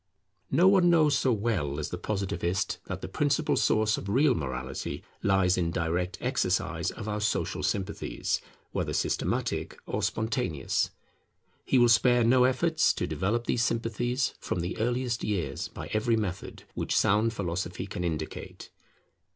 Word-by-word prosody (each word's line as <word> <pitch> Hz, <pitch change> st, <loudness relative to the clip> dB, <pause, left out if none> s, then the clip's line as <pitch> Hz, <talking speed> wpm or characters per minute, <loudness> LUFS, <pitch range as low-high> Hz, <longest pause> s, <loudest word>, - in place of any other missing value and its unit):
No 180 Hz, +3 st, +5 dB
one 190 Hz, -2 st, +5 dB
knows 155 Hz, -4 st, +4 dB
so 135 Hz, -1 st, +2 dB
well 100 Hz, -, 0 dB
as 75 Hz, +1 st, -3 dB
the 90 Hz, -, -4 dB
Positivist 95 Hz, -2 st, -1 dB
that -, -, -5 dB
the -, -, -5 dB
principal -, -, +1 dB
source 110 Hz, 0 st, +2 dB
of 100 Hz, -, -7 dB
real 135 Hz, +6 st, +4 dB
morality 65 Hz, -, -4 dB, 0.2 s
lies 95 Hz, -2 st, +3 dB
in 85 Hz, -2 st, +1 dB
direct 90 Hz, +3 st, -1 dB
exercise 120 Hz, -8 st, 0 dB
of -, -, -7 dB
our 105 Hz, 0 st, -2 dB
social 105 Hz, -, -1 dB
sympathies, 100 Hz, 0 st, -2 dB, 0.3 s
whether -, -, -2 dB
systematic -, -, -1 dB
or 105 Hz, -, -2 dB
spontaneous. 110 Hz, -, 0 dB, 0.8 s
He -, -, +3 dB
will 120 Hz, -1 st, +6 dB
spare 120 Hz, +1 st, +5 dB
no 125 Hz, +2 st, +5 dB
efforts 160 Hz, +6 st, +2 dB
to -, -, -2 dB
develop 115 Hz, +5 st, -1 dB
these 120 Hz, -, +1 dB
sympathies 120 Hz, +3 st, 0 dB
from 85 Hz, -, -2 dB
the 90 Hz, +2 st, -3 dB
earliest 120 Hz, +1 st, 0 dB
years 100 Hz, -5 st, -2 dB
by -, -, -8 dB
every 110 Hz, +2 st, +2 dB
method 100 Hz, -4 st, -4 dB
which -, -, -1 dB
sound 105 Hz, +3 st, +3 dB
philosophy 90 Hz, -2 st, -3 dB
can 90 Hz, -2 st, -5 dB
indicate. 80 Hz, -3 st, -5 dB
105 Hz, 150 wpm, -28 LUFS, 90-120 Hz, 0.8 s, will